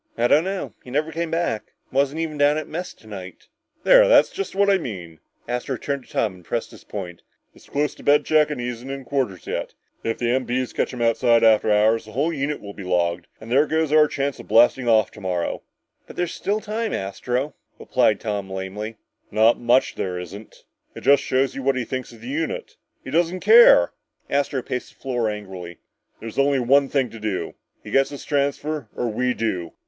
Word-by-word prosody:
"I 120 +1 +3
don't 155 +7 +4
know. 195 0 -4
He - - -12
never 150 +5 -1
came 165 +1 -3
back. 165 -9 -2 0.2
Wasn't 140 +3 +1
even 160 -2 -2
down 145 +1 +4
at 155 - -4
mess 175 +3 -5
tonight." 95 -4 -11 0.3
"There, - - +7
that's - - +5
just 395 - -5
what 200 +1 +3
I 195 -1 +4
mean!" 90 - -7 0.3
Astro 125 +2 -2
turned 140 0 -4
to - - -19
Tom 95 -5 -1
to - - -23
press 115 +7 -3
his - - -14
point. 90 -4 -7 0.3
"It's - - -20
close 145 +1 0
to - - -15
bed 145 0 +4
check 155 -1 +4
and 150 -4 -4
he 120 - -3
isn't 125 +2 -6
in 135 -1 -6
quarters 120 - -2
yet. - - -4 0.3
If 115 - -1
the 120 - -1
MP's 130 0 -1
catch - - -1
him 120 -2 -3
outside 115 0 +3
after 110 -1 +5
hours, 110 +2 +3
the 110 - -12
whole 150 +7 0
unit 145 0 -2
will 100 -1 -8
be 100 - -9
logged 85 -1 0
and 110 +1 -10
there 140 +4 +4
goes 160 -1 0
our 155 0 +6
chance 140 -1 -2
of - - -11
blasting 120 +2 +4
off 110 -2 +4
tomorrow!" 90 -5 -3 0.5
"But - - -11
there's 175 -1 -2
still 210 +2 -1
time, 220 +1 -3
Astro," 125 +8 -2 0.2
replied 105 - +2
Tom 100 -3 -3
lamely. 95 +4 -5 0.3
"Not 110 +3 +4
much 120 +2 +3
there 90 -2 -3
isn't. 95 +5 -10 0.3
It - - -8
just 140 0 +5
shows 130 0 +1
you 135 - -5
what 135 0 +1
he 125 -2 -2
thinks 130 0 -5
of 115 -2 -15
the 120 - -9
unit! 155 +4 -3 0.3
He 130 - -7
just 170 +4 +4
doesn't 180 +2 -6
care!" 215 - +7 0.4
Astro 140 -2 0
paced 125 -1 -5
the - - -36
floor 120 -4 -1
angrily. 95 -5 -7 0.4
"There's 115 +4 -6
only 140 0 +3
one 135 +3 +3
thing 130 -5 0
to 115 - -10
do! 105 -3 -3 0.3
He - - -9
gets 135 0 +3
his 140 - -9
transfer 145 -2 -1
or 120 - -1
we 125 +3 0
do! 90 -7 -2
125 Hz, 210 wpm, -23 LUFS, 110-145 Hz, 0.5 s, There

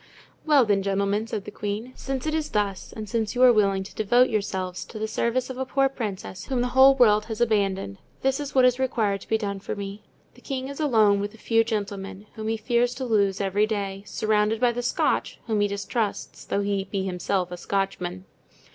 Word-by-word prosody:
"Well, 290 -5 +6
then, 205 -2 +2
gentlemen," 200 +2 0
said 210 -3 -4
the - - -7
queen, 210 +5 -4
"since 270 0 -4
it 310 - -1
is 315 -1 -1
thus, 200 -2 -2
and 215 -1 -7
since 220 +1 -2
you 250 - +3
are 250 -1 +8
willing 195 -3 +2
to 190 - -11
devote 240 +4 +3
yourselves 190 -4 -2
to 220 - -10
the 215 0 -2
service 235 +4 -1
of 260 - -7
a - - +1
poor 270 +1 +2
princess 200 -6 -5
whom 260 -3 -1
the 245 - 0
whole 265 +2 +7
world 215 -5 +4
has 220 0 -5
abandoned, 195 - 0 0.2
this 270 +1 +1
is 290 -1 -5
what 260 -1 +6
is 250 0 +3
required 220 -7 0
to - - -14
be 220 - +3
done 200 -2 -3
for - - -5
me. 200 0 -6 0.3
The - - -19
king 265 -1 -4
is 280 - -7
alone 220 -9 +4
with 205 +2 -4
a - - -15
few 225 0 +2
gentlemen, 200 -3 -4
whom 220 0 -6
he 225 0 0
fears 240 +2 +1
to 260 0 -4
lose 200 -5 +2
every 200 +2 +1
day; 200 -2 -3
surrounded 215 0 +1
by 245 0 +3
the 240 +1 -3
Scotch, 245 - 0
whom 220 -3 0
he 205 - +3
distrusts, 200 +2 -3
although 200 - 0
he 200 -1 -1
be 195 0 -3
himself 180 0 -1
a - - -4
Scotchman. 185 -1 -3
215 Hz, 220 wpm, -25 LUFS, 200-245 Hz, 0.3 s, are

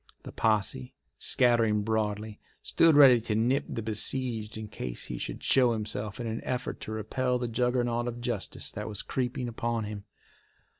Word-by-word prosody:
The - - -8
posse, 105 - 0 0.2
scattering 115 -4 +3
broadly, 105 -1 -2 0.2
stood 165 -2 +4
ready 130 -5 +8
to 110 -1 -2
nip 125 +6 +2
the 115 - -4
besieged 110 0 -2
in 110 -1 -6
case 65 -11 -5
he - - -5
should - - -5
show 125 -3 +4
himself 105 -1 -3
in 120 - -3
an 115 0 -4
effort 125 0 -3
to - - -6
repel 125 +4 -1
the 120 -1 -2
juggernaut 120 0 0
of 120 0 -4
justice 120 -4 -4
that 105 +1 -5
was 105 -2 -2
creeping 125 -1 -2
upon 115 -1 -2
him. 105 -1 -6
115 Hz, 165 wpm, -29 LUFS, 105-125 Hz, 0.2 s, ready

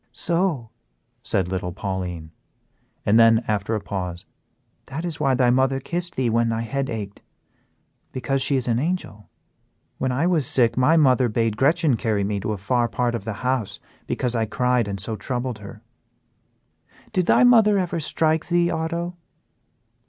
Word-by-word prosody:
"So!" 165 - 0 0.5
said 95 -3 0
little 90 -1 -3
Pauline; 90 -4 -5 0.7
and 110 +3 +4
then, 115 0 +5
after 105 +1 -1
a - - -1
pause, 90 -3 -5 0.6
"That 155 +6 -5
is 170 -3 -4
why 135 -3 +2
thy 125 -1 +3
mother 130 +1 +2
kissed 175 +5 -4
thee 130 -2 0
when 115 0 +2
thy 115 0 -1
head 135 +4 -2
ached 105 -3 -6 0.9
because 135 +1 -1
she 140 +2 +1
is 130 -2 -1
an 115 -1 +1
angel. 150 - -3 0.7
When 130 - 0
I 140 +6 0
was 165 -7 +2
sick 115 -3 +2
my 140 +6 +4
mother 130 -5 +4
bade 115 0 0
Gretchen 145 +1 +2
carry 105 -2 0
me 100 0 -1
to 110 - -3
a 105 - -2
far 120 +5 0
part 120 +1 -1
of 115 -4 -4
the 110 - -3
house, 125 -5 -1 0.3
because 125 -2 -1
I 115 -2 0
cried 125 0 +1
and 100 -1 -4
so 110 +3 -3
troubled 120 +2 -3
her. 100 -1 -11 1.3
Did 180 -2 +1
thy - - +5
mother 225 -4 +6
ever 175 -2 -1
strike 160 +1 0
thee, 175 0 +2
Otto?" 170 +2 -3
125 Hz, 165 wpm, -23 LUFS, 110-155 Hz, 1.3 s, mother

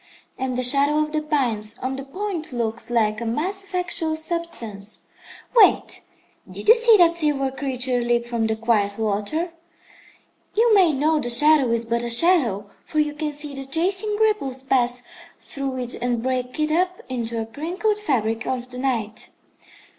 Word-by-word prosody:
and 260 -1 -3
the 255 - -1
shadow 280 +4 +2
of 305 0 0
the 310 0 -1
pines 240 -8 -1
on 260 +1 -3
the 270 - -6
point 350 +2 -5
looks 235 -1 -3
like 220 -2 +1
a - - -2
mass 355 - -2
of 385 -1 -9
actual 335 -3 -1
substance. 280 - -5 0.5
Wait! 465 - +4 0.5
Did - - -8
you 450 - +10
see 465 -2 +6
that 340 -2 +5
silver 290 -5 0
creature 260 -2 -2
leap 240 0 +1
from 235 -2 -1
the 220 - 0
quiet 220 -3 0
water? 220 - -1 1.0
You 455 +1 +4
may 375 -5 +5
know 305 +2 +1
the 240 -4 -2
shadow 290 +2 +4
is 230 0 0
but 235 +1 -1
a 240 - -4
shadow, 235 - +2
for 310 - -7
you 300 -1 +2
can 300 0 -3
see 295 0 -4
the 270 0 -6
chasing 375 +9 +1
ripples 280 -13 0
pass 250 -2 +1 0.4
through 275 -2 -5
it 245 -1 -2
and 240 -1 -1
break 255 +1 -2
it 305 0 +1
up 360 +3 0
into 235 -3 -3
a 225 - -2
crinkled 355 - -2
fabric 230 - -1
of 255 -1 -3
the 250 - -6
night. 230 -5 -2
265 Hz, 175 wpm, -22 LUFS, 235-320 Hz, 1.0 s, you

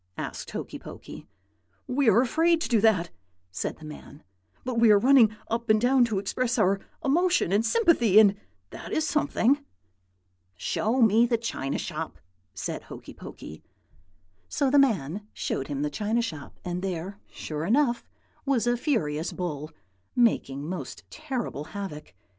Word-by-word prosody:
asked - - -5
Hokey - - -6
Pokey. - - -11 0.6
"'We 265 -1 +2
are 220 +3 +5
afraid 325 +6 +2
to - - -1
do 225 -3 +2
that,' 190 -7 +3 0.4
said 95 - -4
the 155 - -12
man; 150 -1 -11 0.4
'but 250 -2 -1
we 230 -1 +6
are 210 - +7
running 250 0 +6 0.2
up 230 +1 -3
and 215 0 +5
down 250 +2 +4
to 220 -4 -2
express 235 +5 -1
our 195 -2 +3 0.3
emotion 345 - +2
and 205 +3 +3
sympathy, 240 - +4
and 205 -2 +6 0.4
that - - -9
is 315 - +1
something.' 285 -2 +1 0.9
"'Show 225 - 0
me 225 +2 +5
the 235 -1 +1
china 145 -12 -3
shop,' - - -5 0.4
said 90 - -4
Hokey - - -11
Pokey. 80 - -10 0.9
"So 275 -2 +1
the 285 - +6
man 205 - +1
showed 135 - -3
him 145 -1 -3
the 150 - -1
china 215 +8 0
shop; 155 -11 -7
and 180 0 -3
there, 190 +1 -4
sure 155 -1 -5
enough, 240 - +2 0.4
was 270 -5 +1
a 240 0 +2
furious 165 - -1
bull, 155 -4 -4 0.5
making 145 - +1
most 170 -7 -6
terrible 260 - -4
havoc. 170 - -7
220 Hz, 155 wpm, -27 LUFS, 175-255 Hz, 0.9 s, are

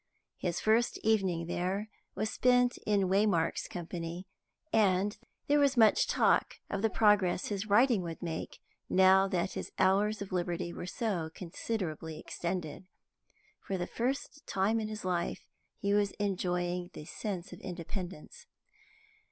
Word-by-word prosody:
His 175 -2 -1
first 225 +2 +2
evening 190 -6 +2
there 185 +5 -2 0.3
was 215 +2 -1
spent 245 -1 +3
in 205 -1 +3
Waymark's 190 -4 +2
company, 170 +1 -5 0.5
and 205 -1 +3 0.3
there 290 +1 +3
was 280 -2 +3
much 220 -2 +5
talk - - +2 0.2
of 200 - -1
the 225 - +3
progress 205 -5 +3
his 205 0 -3
writing 225 +1 +4
would 165 -2 -6
make, 165 -2 -5 0.3
now 190 +1 +6
that 185 -1 -1
his - - -5
hours 205 +3 +3
of 200 -1 -6
liberty 175 -1 -2
were 175 - -6
so 185 -7 -2
considerably 165 -4 -4
extended. 175 0 -4 0.7
For 195 - -3
the 175 - -2
first 270 +7 -3
time 200 +4 +1
in 215 - -2
his 215 -2 -6
life 175 -2 -1 0.3
he 200 0 0
was 205 -1 +2
enjoying 180 -3 -1
the 150 - -8
sense 195 0 -5
of - - -10
independence. 180 -1 -7
190 Hz, 140 wpm, -31 LUFS, 175-215 Hz, 0.7 s, now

